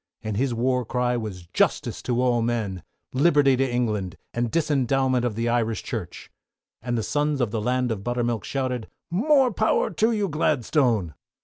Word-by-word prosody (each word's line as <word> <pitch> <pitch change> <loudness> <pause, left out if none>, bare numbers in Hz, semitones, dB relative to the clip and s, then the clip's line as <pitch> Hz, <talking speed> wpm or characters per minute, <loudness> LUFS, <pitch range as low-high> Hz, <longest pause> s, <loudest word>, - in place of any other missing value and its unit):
And 110 -1 -3
his 130 +4 0
war 125 +2 +1
cry 125 +1 0
was 105 -7 -5
"Justice - - 0
to 120 -1 -1
all 125 -2 +2
men," 110 -6 -2 0.3
"Liberty 140 -1 +4
to 135 -1 +1
Ireland," 105 -8 -1 0.2
and 120 0 -1
"Disendowment 135 -4 +1
of 120 -4 -1
the 115 +1 -1
Irish 115 -3 0
Church." - - -6 0.5
And 120 +1 -2
the 110 - -1
sons 145 +4 0
of 120 -5 0
the 110 -1 -2
Land 125 +1 0
of 100 -3 -3
Buttermilk, 120 -1 -1
shouted, 130 -4 -3 0.2
"More 260 - +3
power 220 +2 +1
to 220 +6 +2
you, 210 -3 0
Gladstone!" 125 - +1
125 Hz, 170 wpm, -24 LUFS, 115-140 Hz, 0.5 s, Liberty